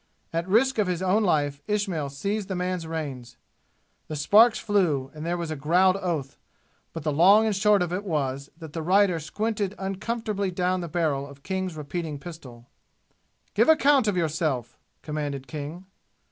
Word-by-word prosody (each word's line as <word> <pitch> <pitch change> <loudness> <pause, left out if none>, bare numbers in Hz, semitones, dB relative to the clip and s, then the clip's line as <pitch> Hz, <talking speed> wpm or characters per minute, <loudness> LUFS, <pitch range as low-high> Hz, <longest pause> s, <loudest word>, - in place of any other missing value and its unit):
At 165 +2 -1
risk 245 +4 +3
of 205 - +2
his 180 0 -1
own 190 +4 +3
life, 145 -6 +1
Ismail 195 -9 -1
seized 200 +9 -3
the 190 - -3
man's 180 -2 -2
reins. 140 -7 -5 0.7
The 155 - -5
sparks 215 +10 +5
flew, 165 -11 0
and 155 0 -8
there 170 +1 -1
was 170 -2 -4
a - - -2
growled 180 +6 +3
oath; 165 -8 -3 0.5
but 165 - -7
the 155 - 0
long 195 +9 +6
and 220 - +1
the 195 - -2
short 205 -2 +4
of 175 0 -4
it 190 +3 -2
was 140 -6 -2
that 160 -3 -10
the 165 - -3
rider 185 +1 +3
squinted 210 +4 -2
uncomfortably 200 +1 -2
down 180 0 0
the 170 - -4
barrel 150 -5 -1
of 140 -1 -14
King's 190 -3 -3
repeating 150 +1 -4
pistol. 135 -6 -11 0.9
"Give - - +3
an 320 - +8
account 280 -5 +4
of 200 -3 +1
yourself!" 155 -6 -1 0.3
commanded 145 -3 -4
King. 150 +6 -7
175 Hz, 175 wpm, -26 LUFS, 150-195 Hz, 0.9 s, an